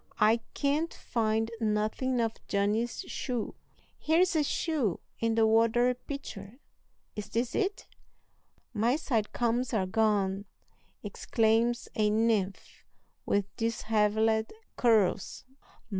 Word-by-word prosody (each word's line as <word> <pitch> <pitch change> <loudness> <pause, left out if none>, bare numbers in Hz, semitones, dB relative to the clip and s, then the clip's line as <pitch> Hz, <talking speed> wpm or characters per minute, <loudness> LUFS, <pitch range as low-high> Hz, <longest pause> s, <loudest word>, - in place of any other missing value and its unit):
"I 215 +2 +5 0.2
can't 300 +4 0
find 225 -1 -1
nothing 220 +4 0
of 225 -1 +1 0.2
Johnny's 210 +4 0
shoe!" 245 -4 -4 0.5
"Here's 335 +3 +2
a 310 - +3
shoe 285 - -1 0.2
in 230 -1 +1
the 225 -1 +4
water 230 +3 +3
pitcher 245 -5 -8 0.6
is 210 -1 -6
this 230 +3 -1
it?" 400 -1 -1 0.9
"My 230 +4 +2
side 235 -9 -1
combs 240 0 0
are 195 -3 +1
gone!" 200 -1 +1 0.6
exclaims 230 +1 +1
a 210 -1 +2
nymph 215 -3 0 0.4
with 200 0 0
dishevelled 220 0 +1 0.2
curls. 215 -6 +2
225 Hz, 105 wpm, -29 LUFS, 210-245 Hz, 0.9 s, I